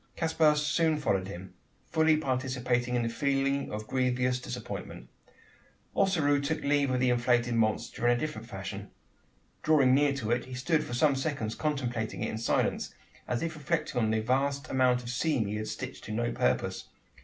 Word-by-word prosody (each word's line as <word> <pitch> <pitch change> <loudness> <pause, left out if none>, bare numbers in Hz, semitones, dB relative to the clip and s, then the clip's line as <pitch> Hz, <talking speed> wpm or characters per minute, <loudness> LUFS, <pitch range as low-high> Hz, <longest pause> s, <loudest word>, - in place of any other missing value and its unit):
Caspar 160 -2 +3
soon 155 +1 +2
followed 95 -10 0
him 95 -1 -9 0.3
fully 160 -1 +3
participating 125 -3 -1
in 120 - +1
the - - 0
feeling 140 +2 0
of 105 0 -5
grievous 125 0 0
disappointment. - - -7 0.9
Ossaroo 155 -7 +3
took 150 +3 -2
leave 145 -1 +2
of 130 0 +1
the 125 -1 +3
inflated 120 0 +2
monster 115 +1 0
in 120 0 +4
a - - -4
different 125 -7 -5
fashion. 95 0 -6 0.7
Drawing 140 -5 +4
near 145 +1 +4
to 120 -5 -3
it, 120 - +1
he 130 0 -8
stood 150 +5 +1
for 120 - -5
some 145 +2 +3
seconds 135 -6 -2
contemplating 125 -7 -2
it - - -2
in 110 - -4
silence 115 - 0 0.3
as 120 - -1
if 165 -1 -2
reflecting 140 -4 -1
on 110 - +2
the 110 0 +1
vast 140 +5 0
amount 125 -1 +3
of 120 - -7
seam 130 -2 +1
he 105 +1 -3
had 110 0 -4
stitched - - -6
to 110 - -6
no 120 +2 -1
purpose. - - 0
130 Hz, 180 wpm, -29 LUFS, 120-145 Hz, 0.9 s, in